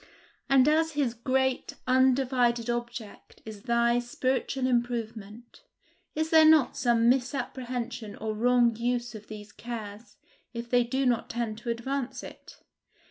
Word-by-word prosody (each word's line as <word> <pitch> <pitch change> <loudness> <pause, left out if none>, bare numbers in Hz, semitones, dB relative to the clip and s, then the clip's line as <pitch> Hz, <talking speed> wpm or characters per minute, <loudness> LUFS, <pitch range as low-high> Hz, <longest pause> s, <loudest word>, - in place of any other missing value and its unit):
And 270 0 +5
as 320 +1 +2
his 280 -5 0
great, 260 +2 -1
undivided 255 -2 +2
object 235 -3 -7
is 215 -2 -9
thy 235 0 +2
spiritual 255 +2 -2
improvement, 235 - -3 0.5
is 315 +1 -1
there 320 -1 +7
not 310 -4 +5
some 235 -2 +2
misapprehension 245 -3 -2
or 220 0 -4
wrong 240 +1 +3
use 240 0 -2
of 215 -1 -10
these 210 -1 -10
cares, 225 -2 -8 0.4
if 235 0 -6
they 245 -1 +4
do 260 +3 -1
not 240 -3 0
tend 225 -2 -3
to 235 - -6
advance 250 +3 -3
it? - - -13
240 Hz, 135 wpm, -28 LUFS, 230-260 Hz, 0.5 s, there